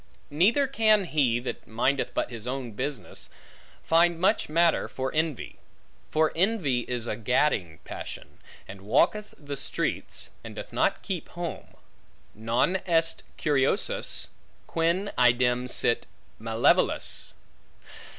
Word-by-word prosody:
Neither 205 - +4
can 220 -6 +3
he, 140 -8 +2
that 125 - -6
mindeth 130 +5 0
but - - -1
his 115 0 -7
own 130 -2 -3
business, 130 0 -3 0.5
find 170 +1 +3
much 195 +1 +2
matter 165 +1 +3
for 130 0 -4
envy. 155 -3 -2 0.5
For 155 0 +2
envy 175 - +1
is 120 -2 -3
a 110 - -2
gadding 110 - +1
passion, - - -8 0.3
and 95 0 -10
walketh 140 - +1
the 145 -2 -6
streets, - - -3
and - - -9
doth - - -8
not - - +1
keep - - -4
home: - - -6 0.6
Non 115 - +1
est 165 -1 +2 0.2
curiosus, 140 -3 +1 0.4
quin 170 +5 0
idem 125 0 +3
sit 120 - +1 0.3
malevolus. 115 +1 +1
140 Hz, 120 wpm, -27 LUFS, 120-170 Hz, 0.6 s, Neither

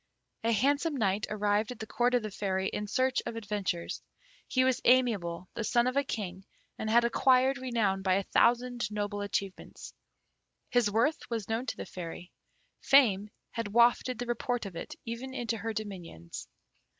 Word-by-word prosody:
A 230 - +2
handsome 285 +7 +2
Knight 205 -2 +1
arrived 210 +1 +1
at 250 - -7
the 220 - -6
Court 245 +3 +1
of 245 - +1
the 215 - -4
Fairy 190 -1 -1
in 210 - -4
search 255 +4 +1
of 235 - -4
adventures. 205 -6 -3 0.5
He 255 - +2
was 260 -1 +2
amiable, 205 -9 +2
the 230 - -3
son 240 +2 +3
of 255 +1 0
a 280 - +3
king, 190 -7 -5 0.4
and 220 - -2
had 235 +2 +5
acquired 260 +3 +3
renown 225 -7 0
by 190 -1 +2
a 195 - +1
thousand 240 +1 +2
noble 205 -1 -3
achievements. 200 -1 -4 0.8
His 245 -4 +3
worth 235 +10 +1
was 225 -4 -3
known 230 +4 -1
to - - -3
the - - -5
Fairy. 175 0 -8 0.5
Fame 215 -7 +4 0.2
had 230 -2 -3
wafted 240 +3 +3
the 245 - -3
report 240 0 -2
of 190 -3 -7
it - - -6
even 245 +3 -5
into 235 -3 -1
her 225 +1 -3
dominions. 185 - -7
225 Hz, 175 wpm, -30 LUFS, 200-245 Hz, 0.8 s, had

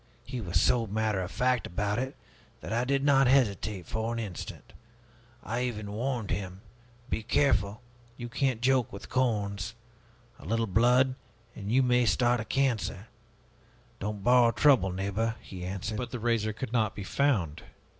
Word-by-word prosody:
He 130 -2 -5
was 85 -5 0
so 115 -2 +2
matter 105 -1 0
of 90 - -4
fact 125 +5 +1
about 105 +4 -1
it 130 +1 -3 0.5
that - - -5
I 120 +2 +1
did 135 +1 +1
not 135 -2 +5
hesitate 110 -7 +2
for 110 +4 -2
an 115 - -3
instant. 105 -6 -7 0.7
I 120 +2 -2
even 105 -4 -4
warned 120 0 -2
him, 95 -1 -4 0.5
'Be 110 - -2
careful! 110 -3 +1 0.3
you 120 - -5
can't 125 -1 -1
joke 130 -2 +2
with 100 - -9
corns! 110 -3 -1 0.6
A - - -13
little 115 0 0
blood, 125 +6 +3 0.4
and 100 0 -5
you 130 +2 +4
may 125 -1 +3
start 120 +5 +3
a 110 - -4
cancer!' 115 -5 -1 0.9
'Don't 105 0 -4
borrow 125 -1 +6
trouble, 125 -6 +4
neighbor,' 100 +4 -1
he 90 -2 -9
answered." 100 +4 -4
"But 125 - -3
the 125 - -4
razor 115 -2 0
could 115 +2 -6
not 110 -3 +1
be 100 - -5
found. 95 - 0
115 Hz, 165 wpm, -29 LUFS, 100-125 Hz, 0.9 s, borrow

